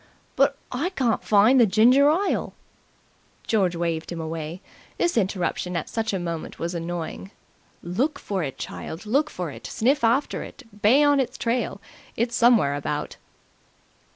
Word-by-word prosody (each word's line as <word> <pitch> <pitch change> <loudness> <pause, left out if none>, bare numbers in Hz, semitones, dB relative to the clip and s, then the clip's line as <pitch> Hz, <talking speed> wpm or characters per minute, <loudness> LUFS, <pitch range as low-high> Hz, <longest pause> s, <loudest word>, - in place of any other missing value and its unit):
"But 275 0 +3
I 285 +8 -1
can't 255 - 0
find 215 +5 +5
the 235 - +6
ginger 245 +8 +5
ile." 370 +6 0 0.9
George 190 -6 +1
waved 165 -1 -2
him 170 - -5
away. 160 +1 -5 0.4
This 345 - +1
interruption 180 -3 -1
at 160 - -4
such 225 -1 -2
a 195 - -1
moment 170 -2 -5
was 170 +2 -3
annoying. 170 +2 -5 0.5
"Look 235 - -1
for 195 -2 -3
it, 140 -5 -4
child, 165 +7 -7
look 280 +8 +1
for 175 -4 -5
it! - - -9
Sniff 260 +4 +1
after 240 +5 +1
it! 280 - -10 0.2
Bay 255 +8 +5
on 290 -1 +4
its 255 -1 -2
trail! 235 -4 -1 0.4
It's 235 +1 0
somewhere 235 -13 +4
about." 145 +1 -4
215 Hz, 155 wpm, -24 LUFS, 170-255 Hz, 0.9 s, the